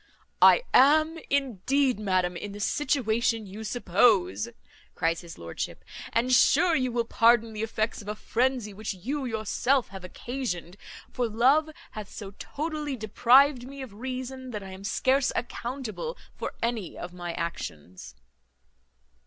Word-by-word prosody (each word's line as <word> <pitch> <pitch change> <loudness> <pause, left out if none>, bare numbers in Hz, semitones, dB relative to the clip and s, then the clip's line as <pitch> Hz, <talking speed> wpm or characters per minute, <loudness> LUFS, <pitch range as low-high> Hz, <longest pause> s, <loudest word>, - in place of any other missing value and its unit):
"I - - +7
am, 310 +5 +5
indeed, 270 -1 +1
madam, 185 -3 0
in 200 +3 -6
the 205 - -8
situation 230 -3 0
you 205 +3 -8
suppose," 200 - +2 0.5
cries 165 +1 0
his 170 -2 -11
lordship; 85 0 -6 0.3
"and 245 +2 +1
sure 325 +6 +5
you 255 -2 0
will 235 -1 0
pardon 230 0 +3
the 215 - -5
effects 220 0 -2
of 200 - -13
a 210 - -3
frenzy 240 -1 -1
which 210 0 -5
you 265 +10 -3
yourself 240 +3 0
have 190 -1 -9
occasioned; 180 -4 -5 0.4
for 245 -2 -1
love 265 +8 +3 0.2
hath 210 -2 -7
so 200 -3 -8
totally 300 -2 -4
deprived 245 +4 +4
me 275 0 -8
of 240 -6 -10
reason, 260 +3 -6
that 210 -4 -5
I 190 - -9
am 190 +1 -10
scarce 260 +6 +2
accountable 255 - -4 0.2
for - - -5
any 230 -6 -2
of 175 0 -7
my 175 -1 -5
actions." 90 - -6
230 Hz, 145 wpm, -27 LUFS, 195-260 Hz, 0.5 s, I